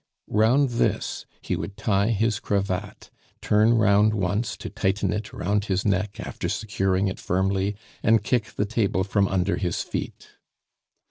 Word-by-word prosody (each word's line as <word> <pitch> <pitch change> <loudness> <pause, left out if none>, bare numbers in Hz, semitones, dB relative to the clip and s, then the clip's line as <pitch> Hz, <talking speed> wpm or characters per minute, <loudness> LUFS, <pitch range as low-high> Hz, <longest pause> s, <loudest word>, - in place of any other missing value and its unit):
Round 120 +6 +4
this 120 -1 -1
he - - -2
would 100 - -6
tie 100 -2 +1
his 110 -1 +1
cravat, 100 -3 -3 0.3
turn 110 +3 +3
round 105 0 +4
once 105 +3 -1
to - - -7
tighten 95 -1 0
it 105 0 -4
round 100 +3 -1
his 95 -2 -1
neck 100 0 0
after - - -4
securing 95 -2 0
it 95 - -4
firmly, 95 +2 0 0.3
and 110 -1 +3
kick 115 0 +1
the 105 - 0
table 100 -3 0
from 100 0 +1
under 90 -2 0
his 90 -1 -1
feet. - - -7
100 Hz, 150 wpm, -25 LUFS, 95-110 Hz, 0.3 s, Round